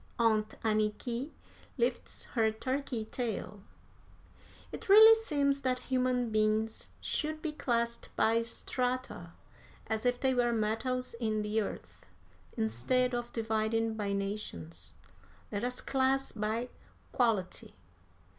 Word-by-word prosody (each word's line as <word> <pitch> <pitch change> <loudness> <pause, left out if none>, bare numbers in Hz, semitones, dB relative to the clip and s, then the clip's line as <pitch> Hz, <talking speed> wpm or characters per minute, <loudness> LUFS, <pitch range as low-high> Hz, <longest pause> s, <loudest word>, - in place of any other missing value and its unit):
Aunt 220 -2 +2
Anniky 220 +4 0 0.5
lifts 480 - -1
her 225 -3 +3
turkey 255 0 -3
tail! 215 -4 -4 1.1
It - - -8
really 440 +3 +10
seems 285 -11 +1
that 255 -1 +1 0.2
human 250 -2 +1
beings 215 +1 +1
should 310 0 -2
be 315 -1 -3
classed 235 -5 -1
by 225 +1 +3
strata, 245 -6 -3 0.5
as 220 0 -2
if 245 0 +1
they 265 -1 +2
were 240 -1 +2
metals 230 +4 -1
in 215 -2 0
the 210 +1 +1
earth. 85 - -7 0.5
Instead 185 - +1
of 240 0 -3
dividing 225 0 0
by 205 -2 -2
nations, 90 - -4 0.6
let 205 +1 -2
us 250 0 -2
class 270 0 +1
by 225 +3 -2 0.4
quality. 220 -7 0
230 Hz, 115 wpm, -32 LUFS, 215-255 Hz, 1.1 s, really